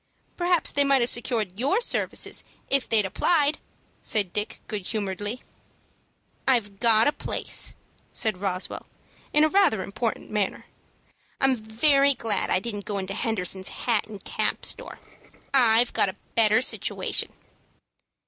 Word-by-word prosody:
"Perhaps 350 -1 +2
they 285 - +2
might 275 -2 +3
have 240 - +2
secured 225 -5 -1
your 285 - +2
services 480 - 0 0.3
if 275 -3 +1
they 225 - +4
had 210 - +3
applied," 295 - +1 0.4
said 200 -5 0
Dick, 210 +1 -2
good 205 -4 -5
humoredly. 205 +2 -4 1.0
"I've 210 -7 +1
got 225 -2 +4
a - - +4
place," 295 - 0 0.4
said 215 -4 0
Roswell, 185 -2 -3 0.4
in 300 +1 +4
rather 385 - +3
an - - -8
important 215 +3 -3
manner. 210 -2 -2 0.7
"I'm 270 -1 +3
very 275 +6 +3
glad 220 -4 -2
I - - +3
didn't 205 -1 -6
go 205 - -3
into 195 0 -4
Henderson's 195 -4 0
hat 230 -4 -1
and 210 -2 -10
cap - - -2
store. - - -1 0.6
I've 240 -2 +4
got - - +2
a 190 - -8 0.2
better 220 +1 +4
situation." - - 0
225 Hz, 140 wpm, -25 LUFS, 205-270 Hz, 1.0 s, they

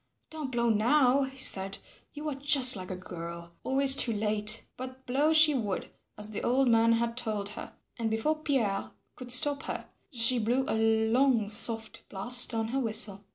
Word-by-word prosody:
"Don't 305 -4 -7
blow 235 -1 -1
now," 250 +5 +2
he 265 0 -6
said, 195 0 +2 0.3
"you 300 +1 -9
are 300 - -3
just 275 -2 +6
like 185 -2 -7
a 185 - -5
girl, 170 -1 -10
always 270 0 +3
too 245 - +1
late." 215 0 0
But 255 +1 -10
blow 285 +5 0
she 315 -1 +5
would, 210 -8 -5 0.3
as 210 +1 -5
the 210 - -6
old 260 +2 0
man 230 0 +2
had 230 0 -2
told 215 -4 -4
her, 210 - -10 0.2
and 225 -1 -2
before 260 +9 -2
Pierre 235 -10 -2 0.3
could 250 -1 -6
stop 280 +3 +4
her - - -6 0.2
she 240 -1 +2
blew 245 +4 -1
a - - -2 0.4
long 245 -4 +1
soft 225 +1 0
blast 245 +6 +2
on 225 -1 -4
her 270 +3 -3
whistle. 210 -4 +1
235 Hz, 180 wpm, -27 LUFS, 215-265 Hz, 0.4 s, just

